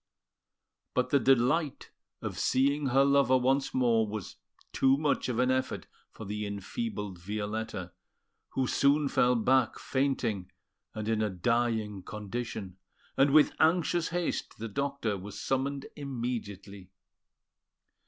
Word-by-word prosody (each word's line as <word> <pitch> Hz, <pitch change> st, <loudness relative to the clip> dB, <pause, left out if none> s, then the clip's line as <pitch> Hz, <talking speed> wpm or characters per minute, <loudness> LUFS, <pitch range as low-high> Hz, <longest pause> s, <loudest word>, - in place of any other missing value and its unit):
But 125 Hz, -, +1 dB
the 140 Hz, -, +5 dB
delight 135 Hz, +4 st, +2 dB, 0.3 s
of -, -, -4 dB
seeing 140 Hz, +2 st, +2 dB
her 135 Hz, +2 st, +4 dB
lover 140 Hz, -2 st, +4 dB
once 135 Hz, +2 st, +1 dB
more 115 Hz, -4 st, +2 dB
was 105 Hz, -2 st, -6 dB, 0.4 s
too 135 Hz, 0 st, +4 dB
much 145 Hz, -3 st, 0 dB
of 120 Hz, -, -1 dB
an 125 Hz, +1 st, +3 dB
effort 130 Hz, 0 st, -1 dB, 0.2 s
for 110 Hz, -, -10 dB
the 105 Hz, +1 st, -4 dB
enfeebled 100 Hz, -, -4 dB
Violetta, 105 Hz, -1 st, -4 dB, 0.6 s
who 130 Hz, -, +1 dB
soon 140 Hz, +3 st, +3 dB
fell 125 Hz, -1 st, +3 dB
back 125 Hz, +2 st, +2 dB
fainting, 120 Hz, -9 st, -1 dB, 0.4 s
and 110 Hz, -1 st, -4 dB
in 110 Hz, -1 st, +1 dB
a 105 Hz, -, +1 dB
dying 110 Hz, +1 st, 0 dB
condition; 105 Hz, -2 st, -6 dB, 0.4 s
and 135 Hz, +1 st, +4 dB
with 150 Hz, +1 st, +6 dB
anxious 170 Hz, +1 st, +3 dB
haste 175 Hz, 0 st, -3 dB
the 115 Hz, -, -5 dB
doctor 140 Hz, -4 st, -2 dB
was 100 Hz, +2 st, -8 dB
summoned 135 Hz, +1 st, -1 dB
immediately. 115 Hz, -8 st, -5 dB
125 Hz, 125 wpm, -30 LUFS, 105-140 Hz, 0.6 s, with